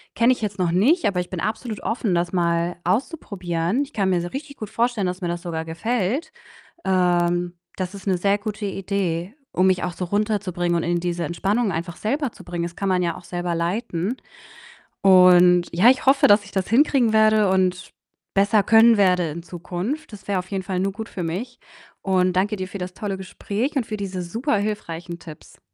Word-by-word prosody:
kenne 235 Hz, +3 st, +4 dB
ich 250 Hz, -, -8 dB
jetzt 205 Hz, -2 st, -3 dB
noch 175 Hz, -2 st, +1 dB
nicht, 260 Hz, -, +3 dB
aber 180 Hz, -3 st, +1 dB
ich 180 Hz, -, -8 dB
bin 185 Hz, -, -5 dB
absolut 215 Hz, +3 st, -3 dB
offen, 225 Hz, -4 st, -1 dB
das 175 Hz, +1 st, 0 dB
mal 170 Hz, -1 st, +1 dB
auszuprobieren. 185 Hz, -, -1 dB
Ich 280 Hz, -, -11 dB
kann 195 Hz, -3 st, +1 dB
mir 180 Hz, -2 st, +2 dB
se 175 Hz, +1 st, -5 dB
richtig 280 Hz, +1 st, -7 dB
gut 215 Hz, -, -6 dB
vorstellen, 230 Hz, -4 st, 0 dB
dass 180 Hz, +2 st, -4 dB
mir 175 Hz, -, -2 dB
das 175 Hz, 0 st, -4 dB
sogar 160 Hz, -2 st, -3 dB
gefällt. 225 Hz, -, -2 dB, 0.5 s
Ähm, 175 Hz, -1 st, +1 dB, 0.2 s
das 185 Hz, +1 st, -4 dB
ist 195 Hz, -, -12 dB
'ne 190 Hz, -2 st, +2 dB
sehr 200 Hz, +3 st, +1 dB
gute 210 Hz, 0 st, -5 dB
Idee, 195 Hz, -1 st, -2 dB, 0.2 s
um 185 Hz, -, +2 dB
mich 185 Hz, -1 st, +2 dB
auch 180 Hz, -, -2 dB
so 180 Hz, -, -4 dB
runterzubringen 190 Hz, -3 st, -1 dB
und 170 Hz, -, 0 dB
in 175 Hz, 0 st, 0 dB
diese 175 Hz, -1 st, -2 dB
Entspannung 195 Hz, +7 st, 0 dB
einfach 170 Hz, +1 st, -4 dB
selber 275 Hz, +3 st, -2 dB
zu -, -, -14 dB
bringen. 175 Hz, -1 st, -4 dB
Das 170 Hz, 0 st, -7 dB
kann 195 Hz, -, -2 dB
man 185 Hz, -1 st, +2 dB
ja 170 Hz, 0 st, -1 dB
auch 180 Hz, -, -12 dB
selber 175 Hz, 0 st, -3 dB
leiten 180 Hz, +4 st, -2 dB, 0.9 s
und 180 Hz, -2 st, +6 dB
ja, 185 Hz, +8 st, +5 dB
ich 260 Hz, -, +2 dB
hoffe, 270 Hz, +1 st, +5 dB
dass 205 Hz, 0 st, +5 dB
ich 200 Hz, -, -13 dB
das 190 Hz, -2 st, -1 dB
hinkriegen 245 Hz, -1 st, +3 dB
werde 215 Hz, -2 st, +4 dB
und 185 Hz, -2 st, 0 dB, 0.4 s
besser 200 Hz, +1 st, +3 dB
können 225 Hz, +2 st, +6 dB
werde 180 Hz, -4 st, +3 dB
in 165 Hz, +3 st, -7 dB
Zukunft. 180 Hz, -, -5 dB
Das 200 Hz, -, -12 dB
wäre 200 Hz, -2 st, 0 dB
auf 180 Hz, +2 st, -8 dB
jeden 195 Hz, -1 st, -2 dB
Fall 185 Hz, 0 st, -2 dB
nur 195 Hz, +1 st, 0 dB
gut 220 Hz, +3 st, -7 dB
für 180 Hz, -, -5 dB
mich 205 Hz, +10 st, -4 dB, 0.4 s
und 185 Hz, -1 st, +2 dB
danke 195 Hz, +4 st, +1 dB
dir 185 Hz, -2 st, -5 dB
für 195 Hz, -, -7 dB
das 180 Hz, -1 st, -6 dB
tolle 195 Hz, 0 st, -4 dB
Gespräch 205 Hz, +7 st, -4 dB
und 265 Hz, -4 st, 0 dB
für 215 Hz, -, -5 dB
diese 190 Hz, -2 st, -4 dB
super 225 Hz, -, -1 dB
hilfreichen 175 Hz, -5 st, -4 dB
Tipps. 155 Hz, -2 st, -13 dB
190 Hz, 210 wpm, -23 LUFS, 175-215 Hz, 0.9 s, und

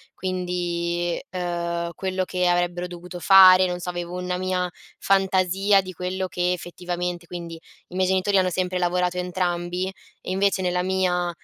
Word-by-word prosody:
quindi, 175 Hz, -2 st, -2 dB
ehm, 170 Hz, -1 st, -2 dB
quello 185 Hz, +1 st, -2 dB
che 180 Hz, 0 st, 0 dB
avrebbero 175 Hz, 0 st, 0 dB
dovuto 175 Hz, 0 st, -9 dB
fare, 185 Hz, 0 st, +8 dB
non 180 Hz, 0 st, -3 dB
so 180 Hz, -, -5 dB
avevo 175 Hz, 0 st, -5 dB
una 180 Hz, 0 st, -2 dB
mia 185 Hz, -1 st, -1 dB, 0.3 s
fantasia 195 Hz, +1 st, +3 dB
di 185 Hz, -1 st, -8 dB
quello 185 Hz, +1 st, -3 dB
che 180 Hz, 0 st, 0 dB
effettivamente 175 Hz, 0 st, -5 dB
quindi, 170 Hz, -1 st, -7 dB, 0.3 s
i 180 Hz, -, -12 dB
miei 185 Hz, 0 st, +2 dB
genitori 190 Hz, +2 st, +2 dB
hanno 185 Hz, -1 st, +3 dB
sempre 185 Hz, +1 st, -1 dB
lavorato 180 Hz, 0 st, 0 dB
entrambi 180 Hz, 0 st, -2 dB, 0.4 s
e -, -, -5 dB
invece 195 Hz, 0 st, +1 dB
nella 180 Hz, -1 st, 0 dB
mia, 180 Hz, -1 st, 0 dB
180 Hz, 150 wpm, -24 LUFS, 175-185 Hz, 0.4 s, fare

